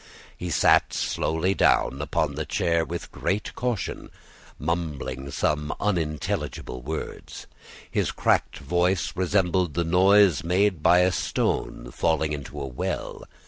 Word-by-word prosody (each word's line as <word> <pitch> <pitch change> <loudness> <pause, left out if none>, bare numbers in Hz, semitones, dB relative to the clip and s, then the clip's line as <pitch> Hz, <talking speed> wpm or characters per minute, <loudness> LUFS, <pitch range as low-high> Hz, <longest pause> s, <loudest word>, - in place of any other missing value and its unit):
He 90 - -5
sat - - +4
slowly 80 +4 0
down 70 -7 +2
upon 75 0 -1
his 80 +1 -4
chair 85 -1 +1
with 75 - -6
great 100 +4 -2
caution, 120 -5 -3 0.5
mumbling 75 -4 -3
some 75 +2 -1
unintelligible 80 -8 -2
words. 80 +5 -6 0.5
His - - 0
cracked - - +1
voice 90 +1 0
resembled 90 -2 +1
the 85 - +1
noise 95 +1 +4
made 90 0 +1
by 85 +3 +5
a 90 +1 +3
stone - - -2
falling 80 -1 0
into 70 -1 -6
a 70 - -3
well. 65 -2 -4
85 Hz, 125 wpm, -25 LUFS, 75-90 Hz, 0.5 s, by